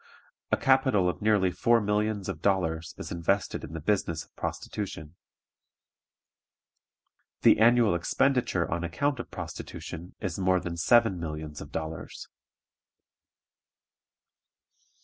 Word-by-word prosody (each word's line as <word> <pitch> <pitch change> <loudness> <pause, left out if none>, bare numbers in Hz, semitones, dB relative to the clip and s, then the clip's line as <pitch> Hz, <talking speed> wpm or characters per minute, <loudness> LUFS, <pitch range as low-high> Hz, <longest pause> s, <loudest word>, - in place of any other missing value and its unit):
A - - +4
capital 130 -8 +3
of 90 - -2
nearly 105 -4 +3
four 115 +6 +3
millions 105 -1 0
of 75 - -5
dollars 90 -3 0
is - - -7
invested 85 +4 -1
in - - -8
the 80 - -4
business 85 -2 -1
of - - -36
prostitution. 80 -7 -5 2.3
The - - +6
annual 115 -2 +5
expenditure 95 +1 +1
on 85 +1 -1
account 140 - -1
of - - -6
prostitution 85 +3 -7
is 95 -3 -4
more 95 -1 +3
than 85 -1 -5
seven 110 +2 +4
millions 75 -2 -6
of 75 - -10
dollars. 80 +1 -6
95 Hz, 115 wpm, -28 LUFS, 85-110 Hz, 2.3 s, The